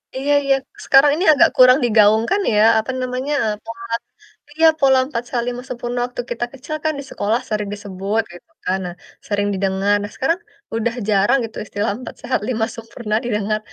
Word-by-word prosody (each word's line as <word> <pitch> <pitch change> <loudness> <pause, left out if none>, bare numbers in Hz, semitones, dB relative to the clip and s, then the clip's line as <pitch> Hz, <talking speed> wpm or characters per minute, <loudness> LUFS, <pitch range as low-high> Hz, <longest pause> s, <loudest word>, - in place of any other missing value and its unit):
Iya 275 +2 0
iya, 275 -1 +3 0.3
sekarang 275 +2 +6
ini 355 +5 -1
agak 285 - +5
kurang 255 +1 +7
digaungkan 220 - +4
ya, 210 - +3 0.2
apa 220 +4 -3
namanya, 255 +3 -2
e - - +1 0.2
pola 230 0 -8 0.7
iya, 325 +1 +5
pola 265 -1 +5
4 250 -4 -3
sehat, 240 -1 -1
5 245 0 -3
sempurna, 245 -1 -4
waktu 245 0 -5
kita 240 0 -1
kecil 280 +3 -6
kan 310 - +2
di - - -6
sekolah 215 +4 0
sering 210 -2 -2
disebut 205 +1 -2
gitu 175 - -15
kan, 185 - +1
nah 175 -1 -6 0.3
sering 205 -1 0
didengar. 195 +1 0
Nah, 205 - -6
sekarang 330 +7 0 0.4
udah 230 +1 -1
jarang 205 +5 +3
gitu, 225 - -11
istilah 205 0 -2
4 255 - -9
sehat, 255 - -1
5 225 -3 0
sempurna, 230 -1 -7
didengar. 215 -2 -1
230 Hz, 185 wpm, -20 LUFS, 210-260 Hz, 0.7 s, kurang